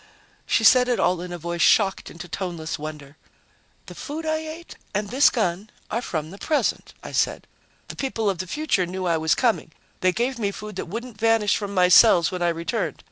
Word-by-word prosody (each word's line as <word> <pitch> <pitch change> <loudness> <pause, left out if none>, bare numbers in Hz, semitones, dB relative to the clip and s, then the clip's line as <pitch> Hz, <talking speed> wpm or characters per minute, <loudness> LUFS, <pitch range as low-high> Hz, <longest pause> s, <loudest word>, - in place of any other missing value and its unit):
She 225 - +2
said 250 +2 +6
it 245 -2 0
all 180 0 +1
in 180 0 -7
a 175 - -5
voice 170 +1 -4
shocked 195 -3 +3
into 175 +1 -10
toneless 170 -3 -4
wonder. 150 -1 -8 0.7
"The - - -10
food 310 +2 -6
I 315 0 0
ate 315 +2 -8 0.2
and 205 0 -1
this 270 +3 +5
gun 205 -3 -2 0.2
are 235 - -1
from 160 -8 -4
the 200 - -11
present," 310 -2 -1
I - - -8
said. - - 0 0.4
"The - - -8
people 230 -5 -2
of 190 -4 0
the 185 - -4
future 245 - 0
knew 185 +1 -4
I 170 -2 +2
was 160 0 +2
coming. 230 -10 0 0.3
They 185 - +3
gave 240 +5 -2
me 205 -3 0
food 210 +1 -8
that - - -4
wouldn't 230 +3 -7
vanish 225 -2 +3
from 200 -1 -4
my 180 -1 +5
cells 180 -3 +6
when 180 -1 -5
I 175 - +2
returned. 165 0 -2
195 Hz, 210 wpm, -23 LUFS, 175-235 Hz, 0.7 s, said